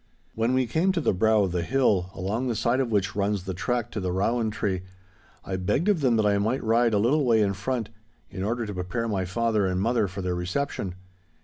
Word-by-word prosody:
When 115 +3 +1
we 130 0 +2
came 160 - +1
to 180 - 0
the 150 - +1
brow 110 +2 +3
of 95 - -1
the 90 0 -1
hill, 100 -4 +1
along 110 +7 -2
the 120 - -1
side 120 +4 +1
of 130 -3 0
which 100 -3 0
runs 100 -1 0
the 95 0 -4
track 120 +6 -2
to - - -3
the 95 -2 -2
Rowan 110 +5 0
Tree, 95 -3 -2 0.6
I 95 - -3
begged 105 - 0
of 190 -7 +2
them 125 -4 +3
that 110 -1 +2
I 100 -1 +3
might 115 +6 0
ride 115 0 +3
a - - +4
little 130 +9 +2
way 115 -3 +4
in 100 -2 +2
front, 115 +3 -3 0.4
in 95 - -6
order 115 +4 -1
to 105 - -5
prepare 90 +6 -3
my 95 -4 -1
father 110 +1 +1
and 90 0 -1
mother 115 +1 +1
for 95 +1 -6
their 90 -1 -1
reception. 90 +1 -3
110 Hz, 235 wpm, -26 LUFS, 95-120 Hz, 0.6 s, a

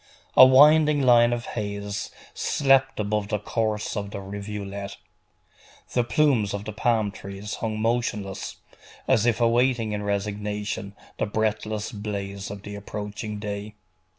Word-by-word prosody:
A - - +10
winding 150 +2 +6
line 120 -2 +6
of 120 0 -2
haze 100 -2 -4 0.2
slept 135 -2 +2
above 105 0 -1
the 105 - 0
course 105 +1 -2
of 100 -1 -3
the 100 - -6
rivulet. 100 0 -6 1.0
The 125 - +3
plumes 120 -4 +2
of 100 0 -6
the 110 - -5
palm 110 -1 +1
trees 100 +2 -7
hung 110 -1 -2
motionless, 110 -4 -2 0.5
as 115 +2 +3
if 115 -1 +2
awaiting 120 -1 +2
in 105 0 -2
resignation 105 0 -3 0.2
the - - 0
breathless 110 0 -1
blaze 100 -2 -5
of 100 -1 -8
the 105 - -7
approaching 105 +1 -6
day. 105 0 -5
105 Hz, 135 wpm, -25 LUFS, 100-115 Hz, 1.0 s, A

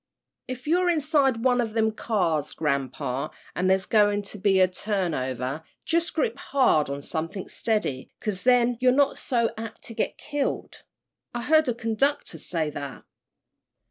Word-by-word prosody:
If 255 0 -6
you're 355 +4 +3
inside 290 -7 +2
one 250 -1 +4
o' - - +1
them 220 0 +1
cars, 180 -9 0
grampa, 140 -1 -1 0.3
an' 185 - +1
there's 190 0 +3
goin' 205 -1 +3
to 200 +1 -8
be 195 -1 +3
a 185 - +6
turnover, 155 - -2 0.2
jus' 335 +1 +2
grip 270 -5 -1
hard 255 - +2
on 140 0 -4
somethin' 165 +5 -4
steady, 210 - -1
'cause 205 -3 -3
then 245 -1 +4
you're 255 0 +5
not 280 +1 +2
so 235 -3 +1
apt 225 -1 -7
to 230 - -8
get - - -2
killed. 290 -2 -3 0.5
I 240 - -2
heard 310 +1 +4
a 240 - 0
conductor 230 - 0
say 160 -1 -1
that." 140 -2 -7
215 Hz, 155 wpm, -26 LUFS, 165-255 Hz, 0.5 s, a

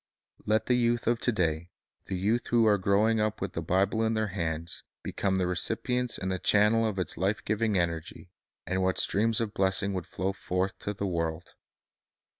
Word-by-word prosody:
Let 110 +1 +2
the 125 - +2
youth 120 -1 +1
of 120 0 +1
to 120 - +1
day, 85 -4 -1 0.4
the - - -3
youth 110 +6 0
who 120 -1 +3
are 105 -2 +4
growing 105 +4 +2
up 110 0 -1
with 95 - -4
the 85 - -3
Bible 95 +6 +1
in 110 0 +1
their 110 -1 0
hands, 85 -1 -4 0.2
become 95 -1 -1
the 95 -1 +1
recipients 115 +7 0
and 95 0 -3
the 95 - -2
channels 105 +4 +4
of 100 - -6
its 90 -3 -2
life 100 +4 -1
giving 110 -1 +1
energy, 85 -2 -3 0.3
and 95 +1 -1
what 95 0 +1
streams 110 +2 +2
of 110 -2 -2
blessing 95 +1 +1
would 95 -3 -4
flow 95 +2 -2
forth 95 0 -2
to 105 - -4
the 100 - -3
world! 85 -2 -3
100 Hz, 195 wpm, -28 LUFS, 90-110 Hz, 0.4 s, are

